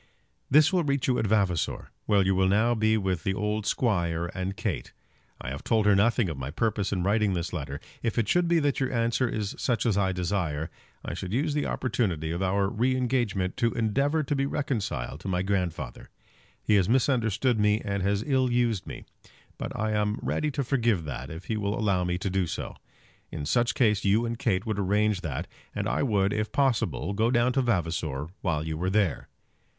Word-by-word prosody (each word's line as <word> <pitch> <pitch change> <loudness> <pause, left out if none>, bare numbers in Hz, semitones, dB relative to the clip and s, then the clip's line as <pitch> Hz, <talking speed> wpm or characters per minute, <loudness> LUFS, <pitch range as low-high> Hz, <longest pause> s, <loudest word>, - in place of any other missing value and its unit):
This 155 +6 +5
will 180 -2 +3
reach 140 -3 0
you 125 -1 +2
at 110 - 0
Vavasor, 95 -5 0 0.2
where 100 -2 +4
you 95 +1 +2
will 95 0 +3
now 110 +5 +3
be 110 -1 +2
with 95 -5 -1
the 95 - 0
old 105 +1 -1
squire 85 -7 0
and 95 +1 -3
Kate. - - -3 0.5
I 65 - -5
have 70 - -6
told 110 -2 +2
her 105 -1 +5
nothing 110 +1 +3
of 80 -5 -5
my 65 +1 -4
purpose 105 +3 -1
in 90 -3 0
writing 105 0 +2
this 85 +1 -3
letter. 70 -4 -4 0.2
If 115 0 -2
it 115 -3 +2
should 175 +6 +2
be 170 0 +3
that 145 -1 +1
your 135 -1 0
answer 115 +1 +1
is 105 -3 -3
such 120 -2 0
as 105 -4 +2
I 95 -1 +2
desire, 85 -4 -2 0.3
I - - -3
should 95 - -5
use 145 +5 +1
the 145 0 0
opportunity 95 -11 -1
of 85 +2 -3
our 95 +1 +1
re 125 +6 +1
engagement 120 -8 0
to 115 -1 +1
endeavour 140 +8 +1
to 145 +1 -1
be 135 0 0
reconciled 100 - -2
to 90 - -8
my 90 -1 0
grandfather. 90 -10 -3 0.5
He 110 - +2
has 95 0 +2
misunderstood 120 -2 +2
me 105 +1 +3
and 100 -1 -1
has 100 +2 +1
ill 130 -3 +2
used 120 -5 +1
me. - - -7 0.6
But - - -4
I 110 0 0
am 105 0 0
ready 155 - 0
to 140 -1 -2
forgive 120 - +1
that, 65 -2 -5
if 80 +3 -8
he 110 - -2
will 100 0 -1
allow 100 -5 +1
me 90 0 -1
to 95 +2 -2
do 95 -2 +1
so. - - -5 0.5
In 75 -3 -5
such 120 +10 +1
case 105 -5 +2
you 105 +4 +3
and 115 0 -3
Kate 95 -5 0
would 110 -2 -2
arrange 105 0 +1
that, 70 -7 -3 0.3
and - - -1
I - - 0
would, 100 -6 +2
if 105 0 -2
possible, 120 - 0
go 110 +3 +2
down 120 +1 +2
to 135 - +2
Vavasor 80 - -1
while 80 -5 -1
you 80 0 -4
are 90 - +1
there. 100 -5 +1
105 Hz, 210 wpm, -27 LUFS, 90-120 Hz, 0.6 s, This